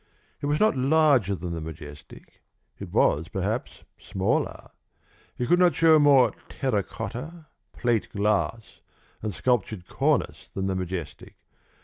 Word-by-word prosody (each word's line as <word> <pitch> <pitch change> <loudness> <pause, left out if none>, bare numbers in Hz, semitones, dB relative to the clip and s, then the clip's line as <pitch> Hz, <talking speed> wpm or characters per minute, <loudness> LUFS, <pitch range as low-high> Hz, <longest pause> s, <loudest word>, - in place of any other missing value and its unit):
It 145 - -2
was 150 +1 +1
not 215 -7 +3
larger 135 - +3
than 85 -1 -5
the 80 - -4
Majestic; 75 -2 -11 0.4
it - - -8
was 80 +3 +2
perhaps 100 +7 -4 0.2
smaller; 95 -1 -2 0.7
it 125 - -1
could 175 +6 +3
not 180 -1 +4
show 160 -1 +5
more 140 -3 +5 0.2
terra 130 -7 -1
cotta, 125 - -7 0.3
plate 120 -3 -1
glass, 105 +2 -1 0.4
and 110 - -3
sculptured 110 -3 -1
cornice - - -1
than 95 - -4
the 95 - 0
Majestic. 90 -3 -6
110 Hz, 130 wpm, -26 LUFS, 95-145 Hz, 0.7 s, show